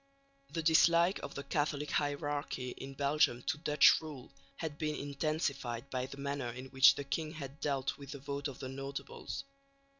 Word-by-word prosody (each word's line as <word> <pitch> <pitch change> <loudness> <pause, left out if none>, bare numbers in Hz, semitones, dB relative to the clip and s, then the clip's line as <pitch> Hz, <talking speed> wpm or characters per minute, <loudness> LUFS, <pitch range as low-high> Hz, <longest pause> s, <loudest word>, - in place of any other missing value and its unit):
The 165 - -3
dislike 170 +3 +5
of - - -7
the 140 - -4
Catholic 145 0 -1
hierarchy 145 -3 -1
in 135 +2 -8
Belgium 140 -3 +2
to 150 - -1
Dutch 150 -2 +6
rule 150 -5 -9 0.2
had 155 -3 -5
been 155 -2 -1
intensified 140 -4 -2
by 130 0 -1
the 140 - -9
manner 140 -2 -2
in 125 +2 -7
which 135 +1 +7
the 140 - -4
king 155 +3 -3
had 140 -3 -7
dealt 140 -1 -1
with 140 -1 -10
the - - -6
vote 140 +1 -4
of 140 - -7
the 130 - -6
notables. 135 +1 -5
140 Hz, 175 wpm, -34 LUFS, 135-150 Hz, 0.2 s, which